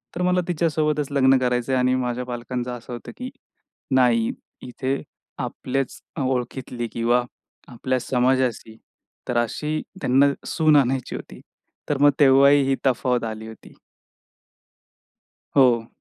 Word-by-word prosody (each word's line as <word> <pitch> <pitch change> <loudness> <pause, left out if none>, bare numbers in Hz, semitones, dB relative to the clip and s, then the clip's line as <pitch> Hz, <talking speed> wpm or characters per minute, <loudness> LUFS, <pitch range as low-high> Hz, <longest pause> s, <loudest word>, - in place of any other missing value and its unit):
तर 180 - -3
मला 180 0 +2
तिच्यासोबतच 150 -4 0
लग्न 135 -1 +4
करायचयं 125 +1 0
आणि 125 0 +2
माझ्या 125 -1 -2
पालकांचं 125 0 -4
असं 120 +1 -10
होतं, 120 - -8
की 250 0 -5 0.7
नाही 120 -3 +3 0.4
इथे 130 +2 -3 0.4
आपल्याच 135 0 -3 0.2
अ, 145 - -1
ओळखीतली 125 -1 -3
किंवा 120 +1 +2 0.4
आपल्या 130 +1 -2
समाजाशी 125 -2 0 0.5
तर 120 - -1
अशी 150 +6 -3 0.2
त्यांना 140 +3 +4
सून 155 -2 +3
आणायची 130 -2 0
होती. - - -9 0.5
तर 145 - +1
मग 145 0 +7
तेव्हाही 140 0 +6
ही 135 - +3
तफावत 125 -1 +1
आली 110 0 -6
होती. 110 - -13 1.8
हो. 120 -4 +4
130 Hz, 125 wpm, -23 LUFS, 125-140 Hz, 1.8 s, मग